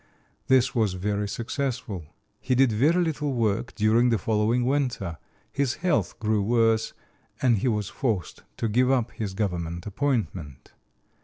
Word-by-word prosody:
This 130 Hz, -1 st, +4 dB
was 110 Hz, -7 st, +1 dB
very 105 Hz, +2 st, -1 dB
successful. 115 Hz, -, -3 dB, 0.3 s
He 130 Hz, 0 st, 0 dB
did 130 Hz, -1 st, +4 dB
very 155 Hz, +11 st, +3 dB
little 150 Hz, -3 st, -1 dB
work 115 Hz, +1 st, -1 dB
during 115 Hz, +3 st, +3 dB
the 115 Hz, -, +2 dB
following 110 Hz, +4 st, +1 dB
winter; 125 Hz, -, -1 dB, 0.3 s
his 140 Hz, -2 st, 0 dB
health 170 Hz, -2 st, 0 dB
grew 110 Hz, -2 st, +1 dB
worse, 115 Hz, +1 st, +2 dB, 0.5 s
and 120 Hz, -5 st, +3 dB
he 130 Hz, -, 0 dB
was 105 Hz, -4 st, 0 dB
forced 110 Hz, -, -2 dB, 0.2 s
to 115 Hz, -, -1 dB
give 125 Hz, +4 st, +2 dB
up 125 Hz, -3 st, +1 dB
his 100 Hz, -4 st, -5 dB
government 85 Hz, -4 st, -3 dB
appointment. 100 Hz, -, -3 dB
115 Hz, 145 wpm, -26 LUFS, 105-130 Hz, 0.5 s, This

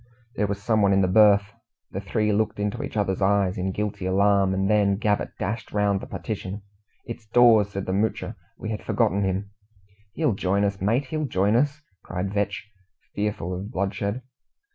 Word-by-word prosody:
There 105 Hz, -, 0 dB
was 100 Hz, 0 st, -3 dB
someone 105 Hz, -2 st, +2 dB
in 95 Hz, -, +4 dB
the 95 Hz, -, +3 dB
berth! 100 Hz, +1 st, +5 dB, 0.4 s
The 95 Hz, -, -4 dB
three 105 Hz, +1 st, 0 dB
looked 110 Hz, 0 st, 0 dB
into 105 Hz, 0 st, -2 dB
each -, -, -5 dB
other's 95 Hz, -2 st, 0 dB
eyes, 95 Hz, -1 st, +2 dB
in 95 Hz, +1 st, -2 dB
guilty 105 Hz, -2 st, -3 dB
alarm, 100 Hz, 0 st, +3 dB
and 95 Hz, 0 st, 0 dB
then 100 Hz, -1 st, +3 dB
Gabbett 105 Hz, -1 st, -1 dB
dashed 110 Hz, 0 st, -4 dB
round 100 Hz, -1 st, +1 dB
the -, -, -8 dB
partition. 100 Hz, -2 st, -5 dB, 0.4 s
"It's 115 Hz, -1 st, -8 dB
Dawes!" 115 Hz, -3 st, +5 dB
said 100 Hz, -1 st, -5 dB
the 95 Hz, -, -2 dB
Moocher. 105 Hz, +3 st, -1 dB, 0.2 s
"We 110 Hz, -, -5 dB
had 105 Hz, -, -4 dB
forgotten 100 Hz, +3 st, +1 dB
him!" 95 Hz, +1 st, -2 dB, 0.6 s
"He'll 150 Hz, -3 st, +1 dB
join 100 Hz, +1 st, 0 dB
us, 100 Hz, -1 st, -1 dB
mate 115 Hz, +8 st, +1 dB
he'll 155 Hz, +3 st, -2 dB
join 100 Hz, 0 st, +1 dB
us!" 145 Hz, +4 st, +1 dB, 0.2 s
cried 95 Hz, +2 st, -4 dB
Vetch, 100 Hz, 0 st, -2 dB, 0.5 s
fearful 100 Hz, -4 st, -2 dB
of 95 Hz, +3 st, -5 dB
bloodshed. 100 Hz, +5 st, -2 dB
100 Hz, 180 wpm, -25 LUFS, 95-105 Hz, 0.6 s, berth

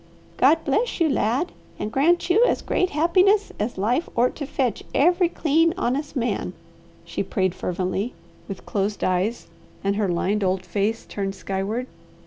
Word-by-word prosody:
"God 315 Hz, +5 st, +4 dB
bless 410 Hz, -, 0 dB
you, 335 Hz, -, +4 dB
lad, 250 Hz, -, 0 dB, 0.3 s
and 215 Hz, -, -4 dB
grant 325 Hz, +8 st, +2 dB
you 395 Hz, +7 st, +4 dB
as -, -, 0 dB
great 370 Hz, -, +1 dB
happiness 370 Hz, +7 st, +3 dB
as 210 Hz, +2 st, -2 dB
life 240 Hz, -, 0 dB
ort 245 Hz, +2 st, +2 dB
to 285 Hz, -, -4 dB
fetch 255 Hz, -6 st, -1 dB
every 350 Hz, +4 st, +4 dB
clean, 330 Hz, +1 st, +2 dB
honest 290 Hz, -2 st, -1 dB
man," 245 Hz, -2 st, -1 dB, 0.5 s
she -, -, -3 dB
prayed 185 Hz, -5 st, 0 dB
fervently, 185 Hz, +6 st, -2 dB, 0.3 s
with 195 Hz, -2 st, -7 dB
closed 200 Hz, 0 st, -2 dB
eyes 185 Hz, +6 st, 0 dB, 0.4 s
and 200 Hz, +1 st, 0 dB
her 210 Hz, -2 st, +1 dB
lined 195 Hz, +4 st, 0 dB
old 185 Hz, 0 st, 0 dB
face 215 Hz, +3 st, -1 dB
turned 195 Hz, -1 st, -4 dB
skyward. 195 Hz, +6 st, -3 dB
240 Hz, 155 wpm, -23 LUFS, 200-320 Hz, 0.5 s, God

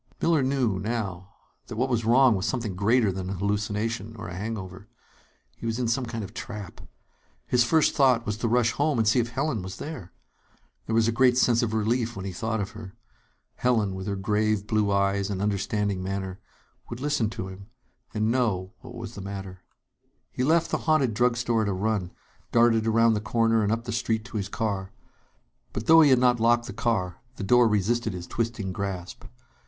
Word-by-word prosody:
Miller 165 Hz, -3 st, +3 dB
knew, 130 Hz, -7 st, 0 dB
now, 100 Hz, -4 st, -3 dB, 0.4 s
that -, -, -7 dB
what 125 Hz, +4 st, +1 dB
was 120 Hz, -3 st, 0 dB
wrong 125 Hz, +2 st, +5 dB
was 95 Hz, +1 st, -1 dB
something 115 Hz, -7 st, -2 dB
greater 110 Hz, +2 st, +3 dB
than 95 Hz, 0 st, -5 dB
a -, -, -2 dB
hallucination 105 Hz, +2 st, -2 dB
or 100 Hz, -, -7 dB
a -, -, -7 dB
hangover. 100 Hz, -1 st, -6 dB, 0.7 s
He 115 Hz, -, -6 dB
was 115 Hz, 0 st, -1 dB
in 125 Hz, -2 st, -1 dB
some 120 Hz, +2 st, 0 dB
kind 115 Hz, -2 st, -4 dB
of 100 Hz, +1 st, -9 dB
trap. 105 Hz, -6 st, -7 dB, 0.6 s
His 120 Hz, -, +3 dB
first 155 Hz, +6 st, +3 dB
thought 130 Hz, -4 st, +4 dB
was 105 Hz, -2 st, -2 dB
to 115 Hz, -, -1 dB
rush 115 Hz, 0 st, +3 dB
home 145 Hz, +1 st, 0 dB
and 110 Hz, -2 st, +2 dB
see 115 Hz, +4 st, +4 dB
if 120 Hz, 0 st, 0 dB
Helen 135 Hz, -2 st, -1 dB
was 95 Hz, +1 st, -7 dB
there. 135 Hz, -, -7 dB, 0.8 s
There 110 Hz, -, 0 dB
was 115 Hz, -1 st, +4 dB
a -, -, +2 dB
great 125 Hz, +1 st, +4 dB
sense 120 Hz, -2 st, +4 dB
of 110 Hz, -2 st, -1 dB
relief 115 Hz, +2 st, 0 dB
when 95 Hz, -, -6 dB
he 95 Hz, -, -3 dB
thought 110 Hz, +5 st, -2 dB
of 100 Hz, 0 st, -3 dB
her. 110 Hz, -4 st, -10 dB, 0.6 s
Helen, 110 Hz, -6 st, +1 dB
with 95 Hz, +1 st, -6 dB
her 100 Hz, -, -1 dB
grave 105 Hz, +1 st, 0 dB
blue 105 Hz, -1 st, +1 dB
eyes 100 Hz, 0 st, +1 dB
and 100 Hz, -2 st, -3 dB
understanding 100 Hz, -1 st, -1 dB
manner, 95 Hz, 0 st, -4 dB, 0.5 s
would 120 Hz, -, -6 dB
listen 145 Hz, -6 st, 0 dB
to 95 Hz, -3 st, -6 dB
him 95 Hz, +1 st, -10 dB, 0.4 s
and 110 Hz, +1 st, 0 dB
know 105 Hz, -6 st, 0 dB
what 125 Hz, -, -11 dB
was 115 Hz, -1 st, -7 dB
the 100 Hz, -, -8 dB
matter. 95 Hz, -1 st, -7 dB, 0.7 s
He 125 Hz, -, -2 dB
left 160 Hz, +4 st, +2 dB
the -, -, 0 dB
haunted 140 Hz, -7 st, +3 dB
drug 120 Hz, +2 st, +2 dB
store 120 Hz, -1 st, +1 dB
at 110 Hz, -, 0 dB
a -, -, 0 dB
run, 100 Hz, -1 st, -1 dB, 0.4 s
darted 115 Hz, -1 st, +4 dB
around 115 Hz, +1 st, +4 dB
the 105 Hz, -, -1 dB
corner 115 Hz, 0 st, +2 dB
and 105 Hz, 0 st, +1 dB
up 115 Hz, +1 st, -1 dB
the 120 Hz, -, -5 dB
street 110 Hz, -1 st, -1 dB
to 120 Hz, -2 st, -6 dB
his 100 Hz, -1 st, -3 dB
car. 100 Hz, -3 st, -3 dB, 0.8 s
But, -, -, -4 dB
though 165 Hz, 0 st, +8 dB
he 150 Hz, -, +6 dB
had 130 Hz, -, +6 dB
not 125 Hz, -1 st, +3 dB
locked 120 Hz, +1 st, +3 dB
the -, -, -7 dB
car, 90 Hz, -7 st, -1 dB
the -, -, -6 dB
door 120 Hz, +4 st, +5 dB
resisted 110 Hz, +1 st, 0 dB
his 90 Hz, -1 st, -6 dB
twisting 115 Hz, -4 st, -3 dB
grasp. 95 Hz, -2 st, -5 dB
110 Hz, 205 wpm, -26 LUFS, 100-120 Hz, 0.8 s, though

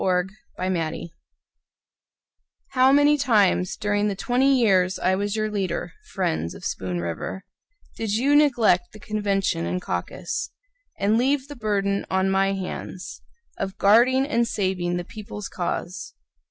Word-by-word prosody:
Enoch 180 Hz, 0 st, +1 dB, 0.3 s
Dunlap 170 Hz, -3 st, -2 dB, 1.6 s
How 260 Hz, 0 st, +4 dB
many 290 Hz, +1 st, +5 dB
times, 205 Hz, -8 st, +2 dB
during 205 Hz, 0 st, 0 dB
the 200 Hz, -, -1 dB
twenty 260 Hz, +6 st, +2 dB
years 190 Hz, -5 st, +3 dB
I 185 Hz, +1 st, +1 dB
was 205 Hz, +2 st, -1 dB
your 215 Hz, -1 st, -1 dB
leader, 195 Hz, -3 st, -2 dB, 0.2 s
friends 80 Hz, +1 st, -1 dB
of -, -, -10 dB
Spoon 90 Hz, -2 st, -3 dB
River, 85 Hz, -, -4 dB, 0.5 s
Did 225 Hz, -2 st, -2 dB
you 275 Hz, +6 st, +3 dB
neglect 240 Hz, -11 st, +3 dB
the 215 Hz, -, -12 dB
convention 200 Hz, -, -1 dB
and 90 Hz, +1 st, -1 dB
caucus, 90 Hz, -, -4 dB, 0.5 s
And 210 Hz, +3 st, +2 dB
leave 270 Hz, +2 st, +1 dB
the 290 Hz, -, -9 dB
burden 200 Hz, -4 st, -1 dB
on 190 Hz, 0 st, +1 dB
my 195 Hz, 0 st, +2 dB
hands 185 Hz, -1 st, -6 dB, 0.4 s
Of 195 Hz, 0 st, -4 dB
guarding 245 Hz, +6 st, +5 dB
and 235 Hz, -5 st, +1 dB
saving 185 Hz, -4 st, -1 dB
the 175 Hz, -, -4 dB
people's 210 Hz, -1 st, -8 dB
cause? 180 Hz, +1 st, -4 dB
200 Hz, 140 wpm, -24 LUFS, 180-230 Hz, 1.6 s, many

